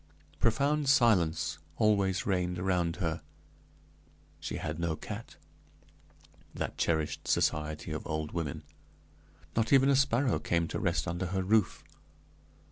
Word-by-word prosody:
Profound 140 +4 +2
silence 85 - +3 0.2
always 100 -4 +2
reigned 90 -2 0
around 90 -2 0
her; 85 -4 -2 1.2
she - - -5
had 75 +1 -4
no 85 -2 0
cat - - -8 1.2
that - - -3
cherished 80 -2 -1
society 75 0 0
of 80 - -5
old 80 -1 -3
women 80 -5 -4 0.9
not 115 0 +1
even 135 0 +6
a 140 - +5
sparrow 130 -2 +2
came 85 -1 0
to - - -3
rest 85 -2 0
under 90 +1 -2
her 95 +1 -1
roof. 105 +1 +2
90 Hz, 125 wpm, -30 LUFS, 80-110 Hz, 1.2 s, even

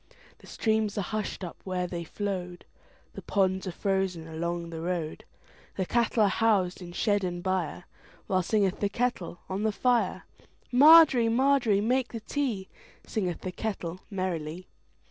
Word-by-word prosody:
The - - -16
streams 220 -2 0
are - - +1
hushed 210 0 -4
up 175 - -6
where 185 -1 -2
they 175 -1 -4
flowed, 180 -1 -5 0.5
The - - -8
ponds 190 -1 0
are - - -2
frozen 190 -3 -1
along 170 +1 -4
the 165 -1 -6
road, 170 -2 -3 0.5
The 190 - -1
cattle 235 +1 +2
are - - +5
housed 195 -4 +1
in 175 -1 -8
shed 205 +2 +1
and 175 -1 -3
byreWhile 185 +1 -3
singeth 200 0 +1
the 205 - 0
kettle 200 -6 -2
on 190 +2 -3
the 220 0 +1
fire. 245 +3 +1 0.5
Margery, 280 -3 +7
Margery, 245 -4 +3
make 250 +3 0
the 230 - -3
tea, 225 -5 -2 0.4
Singeth 185 -6 -2
the 185 - -4
kettle 180 -3 -4
merrily. 180 -3 -3
190 Hz, 150 wpm, -28 LUFS, 180-220 Hz, 0.5 s, Margery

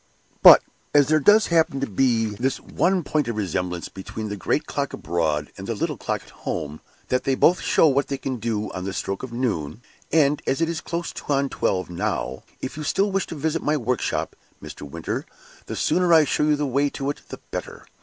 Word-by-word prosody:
"But - - +10 0.3
as 145 -1 +5
there 155 0 +4
does 210 +8 +6
happen 160 -4 +3
to 135 - 0
be 115 +1 +2
this 120 +5 -2
one 185 0 0
point 150 -2 0
of 115 - -2
resemblance 90 -3 -2
between 105 +3 -7
the 105 - -3
great 100 - -1
clock - - -3
abroad 80 -3 -1
and - - -7
the - - -2
little - - -2
clock - - -3
at - - -18
home, 75 -2 -5 0.3
that 125 - +1
they 135 - +1
both 175 +6 +4
show - - +4
what 140 -1 +2
they 140 - -2
can 130 -1 -3
do 110 -2 -2
on 95 - -5
the 95 0 -4
stroke 95 0 -3
of 130 - -7
noon, 115 - -2 0.3
and 150 -2 +3
as 135 - +1
it 165 0 +1
is 165 -1 -3
close 170 0 -4 0.2
on 140 -1 +2
twelve 95 -6 -1
now, 75 -5 -2 0.2
if 130 - -5
you 155 - -4
still 195 +7 +1
wish 195 -1 0
to - - -6
visit 160 +2 -1
my 150 +1 +1
workshop, 125 -2 -1 0.2
Mr. - - -10
Midwinter, 75 +3 -4 0.4
the - - -4
sooner 180 -1 +2
I 160 -2 +7
show 150 +2 +1
you 150 0 +3
the 145 0 -1
way 140 +2 +1
to 140 0 -2
it - - -10
the - - -8
better." - - -6
135 Hz, 215 wpm, -23 LUFS, 105-155 Hz, 0.4 s, But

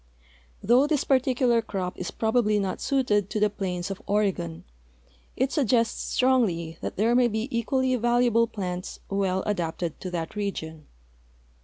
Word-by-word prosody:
Though 245 +6 +4
this 295 -3 +1
particular 255 -3 +2
crop 190 -4 -4
is 180 - -3
probably 220 -1 +1
not 195 -2 -2
suited 210 -8 +1
to 215 - -2
the 210 -1 +2
plains 185 -2 -3
of 195 - -6
Oregon, 190 - -1 0.7
it 260 +1 +1
suggests 240 -6 +1
strongly 190 -11 +1
that - - -4
there 225 +4 +3
may 245 0 +4
be 220 +1 -2
equally 255 +2 +1
valuable 240 -1 +3
plants 185 -4 -5
well 190 -1 0
adapted 170 -4 -2
to 185 - -5
that 170 0 -4
region. 160 -7 -4
210 Hz, 145 wpm, -26 LUFS, 185-240 Hz, 0.7 s, Though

